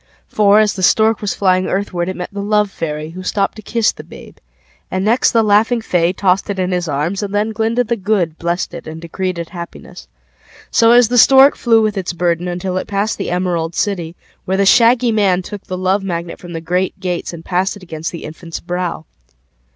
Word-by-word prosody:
For, 210 0 +4
as 215 -1 +3
the 190 - -6
Stork 220 +4 +3
was 205 - -2
flying 185 -1 +2
Earthward, 185 -2 -2
It 185 - -4
met 180 +2 -7
The 200 - -4
Love 210 0 +1
Fairy, 155 -2 -5
Who 185 +2 -8
stopped 195 +2 -1
to - - -8
kiss 230 +1 +1
the - - -11
babe; - - -13 0.5
And 185 +1 -2
next 230 +4 +3
The 230 -2 +2
Laughing 215 +3 +3
FayTossed 180 0 +1
it 200 - -2
in 185 0 -1
his 180 -1 -1
arms. 155 +7 -2
And 205 0 -4
then 210 +2 0
Glinda 225 +3 0
the 235 0 -1
GoodBlessed 175 -4 -1
it 170 - -8
and 160 0 -7
decreed 180 +2 -4
it 170 -1 -5
happiness. 170 -2 -10 0.6
So 230 -1 +4
as 240 -1 +6
the 245 0 +3
Stork 270 +3 +7
Flew 225 -2 +3
with 210 -2 0
its 180 -1 -4
burdenUntil 175 +2 -1
it - - -11
passed 205 +2 -1
the - - -3
Emerald 175 -2 -1
City, 175 -6 -2 0.3
Where 190 +1 0
the 200 - +2
Shaggy 235 +3 +5
Man 195 -4 +2
tookThe 185 -1 -7
Love 190 +2 +1
Magnet 170 -2 -4
from 175 -1 -10
the 165 - -5
Great 180 +4 -1
GatesAnd 175 -2 -4
passed 190 +3 -1
it 195 - -15
against 160 -2 -5
the 170 - -8
infant's 165 +2 -8
brow. 175 -2 -4
185 Hz, 205 wpm, -17 LUFS, 175-210 Hz, 0.6 s, Stork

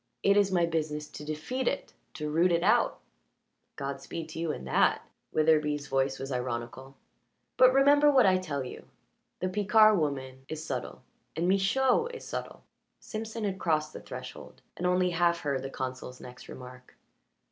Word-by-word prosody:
"It 200 - +5
is 200 -1 +3
my 175 -2 +3
business 155 -2 -2
to 150 - -9
defeat 160 - -3
it 280 - -2 0.2
to 150 - -4
root 170 +4 +3
it 170 0 +2
out." - - +3 0.8
"Godspeed 140 +4 -5
to 160 - -7
you 165 -2 -1
in - - -6
that" 65 - +2 0.2
Witherbee's 150 -2 +2
voice 135 0 0
was 135 +1 -6
ironical. 125 +1 -4 0.6
"But 255 0 +7
remember 285 +2 +5
what 265 -5 +5
I 185 -1 +4
tell 140 -7 -3
you. 125 - -9 0.6
The 185 - 0
Picard 210 +1 +5
woman 130 -3 -3
is 155 0 -5
subtle, - - -5 0.3
and 170 +2 0
Michaud 225 - +3
is - - -9
subtle." - - -6 0.4
Simpson 220 +1 -6
had 195 -2 -2
crossed 155 -2 0
the - - -8
threshold, 125 -1 -9
and 180 - -1
only 180 0 +2
half 170 0 +2
heard 140 -3 -1
the 135 - -5
consul's 130 -1 -6
next 125 0 -12
remark. 125 0 -11
160 Hz, 165 wpm, -29 LUFS, 135-195 Hz, 0.8 s, But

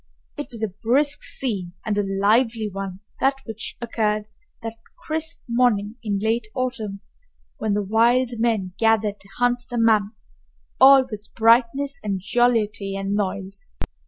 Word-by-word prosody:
It - - -5
was 230 -2 -6
a - - +2
brisk 280 +5 +3
scene 195 -9 -2
and 215 - 0
a 205 - +2
lively 215 +3 +2
one, 195 -1 -6 0.2
that 270 +1 +3
which 225 0 -7
occurred 215 -3 -1 0.4
that 225 -1 -4 0.2
crisp 320 +1 -2
morning 235 -3 +1
in 210 -3 -1
late 220 +2 0
autumn 225 -6 -3 0.6
when 215 -2 -1
the 205 - 0
wild 235 +5 +3
men 220 -6 0
gathered 220 -2 +2
to 195 - -16
hunt 245 0 +2
the 245 - -3
mammoth. 220 -2 +3 0.7
All 270 0 +8
was 215 -4 -7
brightness 240 +5 +2
and 200 -2 -1
jollity 210 -1 +1
and 195 0 -2
noise. 195 -1 -4
220 Hz, 145 wpm, -23 LUFS, 200-245 Hz, 0.7 s, All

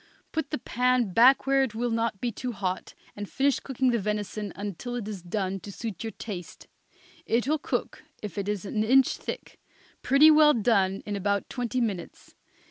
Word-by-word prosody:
Put 320 -3 -2
the 300 - -2
pan 250 -4 +1
back 255 +6 +6
where 275 0 +3
it 245 -5 -1
will 240 +1 -1
not 225 -3 -1
be 240 +2 -1
too 245 +3 -5
hot, 185 -3 -3 0.2
and 205 -1 -6
finish 275 0 +1
cooking 260 -1 0
the 235 - +1
venison 210 0 -3
until 205 +5 -5
it 230 -4 -4
is 205 -4 -5
done 190 +1 -2
to 200 - -9
suit 220 +1 -6
your 225 - -3
taste. 195 -5 -8 0.6
It 235 +3 +1
will 310 +1 +1
cook, - - -3 0.2
if 210 - -5
it 200 0 -3
is 210 -1 -2
an 215 +2 -1
inch 260 +4 +4
thick, - - -7 0.4
pretty 280 +4 +6
well 300 -1 +6
done 200 -4 +2
in 205 - -3
about 200 0 -1
twenty 245 0 -2
minutes. 205 -8 -4
225 Hz, 190 wpm, -27 LUFS, 200-255 Hz, 0.6 s, back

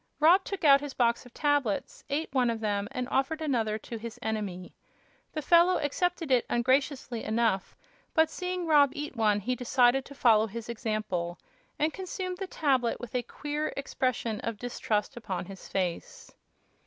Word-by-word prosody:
Rob 345 +5 +6
took 395 -2 -5
out 280 -2 +7
his 290 -2 -6
box 235 0 +1
of 245 - -19
tablets, 290 -8 0
ate 290 0 -2
one 250 -3 +3
of 230 -1 -2
them 205 -2 -1
and 255 -2 -3
offered 270 +4 0
another 235 -9 0
to 225 +1 -7
his 230 0 -7
enemy. 205 -5 -3 0.6
The 310 - -4
fellow 345 +3 +5
accepted 330 +1 -1
it 250 -2 +4
ungraciously 255 -1 +1
enough, 220 -4 0 0.4
but 320 -1 +5
seeing 360 +2 -3
Rob 295 -3 +6
eat 295 -2 -5
one 210 -3 +2
he 250 +5 -1
decided 250 +1 +3
to 280 - -11
follow 225 -5 +4
his 230 +2 -7
example, 215 -7 -2 0.4
and 310 +1 +1
consumed 370 -1 -5
the 385 - -3
tablet 265 -9 +1
with 245 -2 -8
a 250 - +1
queer 295 +5 -4
expression 255 -5 -1
of 230 -2 -4
distrust 215 -3 -2
upon 190 -6 -4
his 195 +1 -10
face. 180 -3 -4
250 Hz, 165 wpm, -29 LUFS, 220-295 Hz, 0.6 s, out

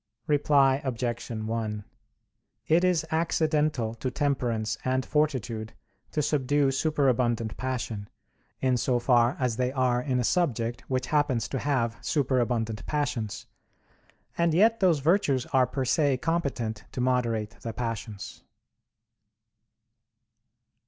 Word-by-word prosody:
Reply 140 -2 +3
Obj. 120 -2 -3
1: 110 -2 -3 0.8
It 165 +3 +3
is 175 -3 +2
accidental 155 -7 +1
to 125 +3 -3
temperance 120 -6 -1
and 130 0 0
fortitude 125 -7 -1 0.4
to 150 - 0
subdue 145 -1 +2
superabundant 125 -6 +1
passion, 120 -5 -4 0.5
in 130 -1 +2
so 125 +1 +1
far 120 0 +3
as 125 -4 0
they 125 0 0
are 125 -2 +1
in 125 -1 0
a - - +1
subject 120 -7 0
which 130 -1 0
happens 140 -6 +2
to 135 - -2
have 120 -5 0
superabundant 120 -6 0
passions, 125 -8 -2 0.9
and 170 -2 +3
yet 225 +5 +4
those 175 -7 +3
virtues 145 -5 +2
are 130 -1 +4
per 130 +1 -2
se 140 0 +2
competent 125 -8 -2
to - - -5
moderate 120 -4 0
the 115 - -4
passions. 110 -3 -5
130 Hz, 120 wpm, -27 LUFS, 115-145 Hz, 0.9 s, yet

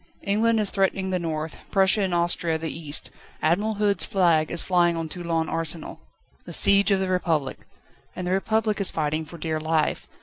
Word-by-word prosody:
England 220 +3 +2
is 210 -2 -1
threatening 190 -1 0
the 185 - 0
north, 160 -2 -4
Prussia 195 +1 +3
and 190 -2 0
Austria 170 -1 0
the 160 0 -4
east. 155 -2 -3 0.3
Admiral 205 +7 +1
Hood's 205 -1 +1
flag 170 -7 +2
is 170 - -1
flying 175 -2 +2
on 165 -1 -3
Toulon 165 -1 -2
Arsenal. 165 0 -4 0.4
The - - -8
siege 200 0 +5
of 195 -1 +3
the 190 - -1
Republic! 165 -7 -1 0.6
And 180 - -5
the 180 - -2
Republic 215 +2 0
is 195 - +3
fighting 155 0 -2
for 170 +3 -11
dear 160 -1 -2
life. 160 0 -1
175 Hz, 180 wpm, -24 LUFS, 160-195 Hz, 0.6 s, siege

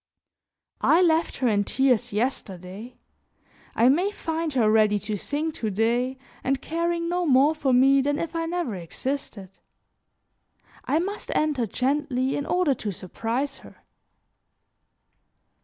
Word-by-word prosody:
I 345 +3 +5
left 325 -1 +2
her 255 - +1
in 205 -3 +2
tears 255 +1 +1
yesterday; 210 -1 -4 0.8
I 230 - +4
may 345 +10 +3
find 325 -5 -3
her 240 -5 +3
ready 215 -1 +4
to 210 +1 -4
sing 295 - -2
to 225 -7 -3
day 240 +5 0 0.3
and 270 0 0
caring 335 +3 -2
no 355 +1 0
more 280 +3 +5
for 290 -4 0
me 270 +2 +5
than 290 +1 0
if 335 +1 -4
I 330 0 -1
never 340 -8 -2
existed. 195 - -5 1.3
I 300 - +1
must 395 +5 -3
enter 290 -7 +1
gently 265 +2 0
in 285 - -3
order 355 -6 +2
to 215 -4 -4
surprise 230 +9 -3
her." - - -15
270 Hz, 135 wpm, -25 LUFS, 225-320 Hz, 1.3 s, I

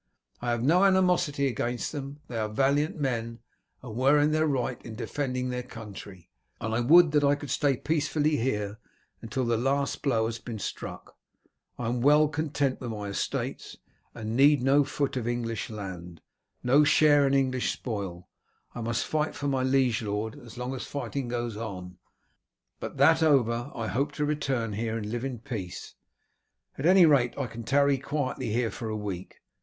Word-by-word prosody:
I 120 - -2
have 120 0 0
no 170 +8 +4
animosity 180 -7 +3
against 120 -1 -2
them, 145 0 -6
they 115 -2 -4
are 110 -1 -1
valiant 140 +7 +1
men, 115 -4 -2 0.5
and 115 -4 -8
were 135 +4 +4
in 145 +1 +3
their 155 +1 +2
right 130 -3 -2
in 110 - -8
defending 125 0 -2
their 125 0 -2
country, 100 -7 -10 0.3
and 110 0 -3
I 115 - +1
would 160 +6 +6
that 150 -1 +3
I 140 0 +4
could 145 -1 -7
stay 140 -3 +2
peacefully 155 0 0
here 105 -4 -2 0.4
until 120 +3 -2
the 115 -1 +1
last 140 +4 0
blow 115 -6 +1
has 115 0 -3
been 115 -2 -6
struck. 100 - -7 0.6
I 120 - -3
am 120 +1 -1
well 150 +3 +5
content 145 -3 -1
with 125 - -4
my 105 -2 -5
estates, 100 - -3 0.4
and 110 0 -4
need 140 0 +5
no 140 +2 +5
foot 140 -1 -2
of 120 -2 -2
English 115 -3 -2
land, 90 -6 -7 0.4
no 135 +4 +5
share 145 -1 +5
in 135 - +2
English 130 -2 +1
spoil 100 -7 -5 0.5
I 120 - -6
must 115 0 -1
fight 155 0 -1
for 145 - -3
my 135 -2 +1
liege 130 -3 +2
lord 105 +1 -3
as 120 -2 -13
long 125 +1 -3
as 130 - -5
fighting 140 -1 -4
goes 120 -2 -3
on, 90 -5 -7 0.8
but - - -6
that 160 +4 +5
over 125 -5 +2
I 115 - -3
hope 135 +6 -1
to 150 - -1
return 135 -7 -1
here 110 +2 -2
and 110 - -4
live 120 +3 -3
in 135 -2 -3
peace. 110 -6 -6 0.8
At 140 - -1
any 185 -1 +7
rate 135 -6 +3
I 140 - -1
can 115 0 -8
tarry 140 +2 +3
quietly 135 -4 -3
here 115 -1 0
for 110 +2 -5
a 110 - -2
week. 100 -4 -6
125 Hz, 180 wpm, -28 LUFS, 115-145 Hz, 0.8 s, any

